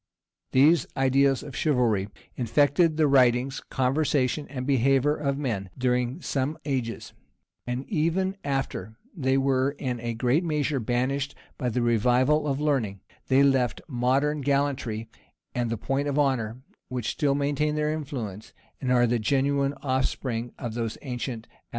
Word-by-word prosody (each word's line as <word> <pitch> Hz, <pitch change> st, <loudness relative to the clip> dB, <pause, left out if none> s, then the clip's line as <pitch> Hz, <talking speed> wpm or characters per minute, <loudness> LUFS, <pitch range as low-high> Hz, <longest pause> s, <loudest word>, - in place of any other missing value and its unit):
These 145 Hz, +3 st, +5 dB
ideas 135 Hz, 0 st, +3 dB
of 140 Hz, -3 st, -9 dB
chivalry 120 Hz, -9 st, +1 dB, 0.3 s
infected 145 Hz, +6 st, +2 dB
the 155 Hz, -2 st, +4 dB
writings, 130 Hz, -1 st, +3 dB
conversation, 135 Hz, +1 st, +1 dB
and 130 Hz, -2 st, -5 dB
behavior 135 Hz, +2 st, +3 dB
of 140 Hz, -2 st, -1 dB
men, 110 Hz, -9 st, -2 dB
during 125 Hz, +4 st, 0 dB
some 140 Hz, +3 st, -1 dB
ages; 130 Hz, -5 st, -3 dB, 0.5 s
and 125 Hz, +2 st, -3 dB
even 185 Hz, +2 st, 0 dB
after 135 Hz, -5 st, -3 dB, 0.2 s
they 135 Hz, -5 st, +1 dB
were, 135 Hz, +1 st, +1 dB
in 125 Hz, -4 st, -3 dB
a 115 Hz, 0 st, -3 dB
great 125 Hz, +8 st, +2 dB
measure, 150 Hz, -3 st, 0 dB
banished 130 Hz, +4 st, -1 dB, 0.2 s
by 125 Hz, -4 st, 0 dB
the 120 Hz, +1 st, 0 dB
revival 125 Hz, +6 st, +3 dB
of 140 Hz, -1 st, -1 dB
learning, 125 Hz, -11 st, 0 dB, 0.3 s
they 135 Hz, +1 st, +5 dB
left 135 Hz, -3 st, +2 dB
modern 135 Hz, +3 st, +1 dB
gallantry 135 Hz, -5 st, -1 dB, 0.5 s
and 120 Hz, -2 st, -1 dB
the 115 Hz, -, -2 dB
point 135 Hz, +6 st, -1 dB
of 145 Hz, 0 st, -1 dB
honor, 125 Hz, -6 st, +1 dB, 0.3 s
which 125 Hz, -3 st, -2 dB
still 140 Hz, -3 st, +1 dB
maintain 145 Hz, +1 st, 0 dB
their 150 Hz, 0 st, 0 dB
influence, 125 Hz, -, -6 dB, 0.3 s
and 130 Hz, -2 st, 0 dB
are 120 Hz, -1 st, +5 dB
the 120 Hz, 0 st, +1 dB
genuine 140 Hz, +4 st, +1 dB
off 130 Hz, -1 st, +1 dB
spring 120 Hz, -2 st, -3 dB
of 120 Hz, -4 st, -5 dB
those 115 Hz, -1 st, -3 dB
ancient 120 Hz, -3 st, -4 dB
affectations. -, -, -31 dB
135 Hz, 150 wpm, -26 LUFS, 120-145 Hz, 0.5 s, These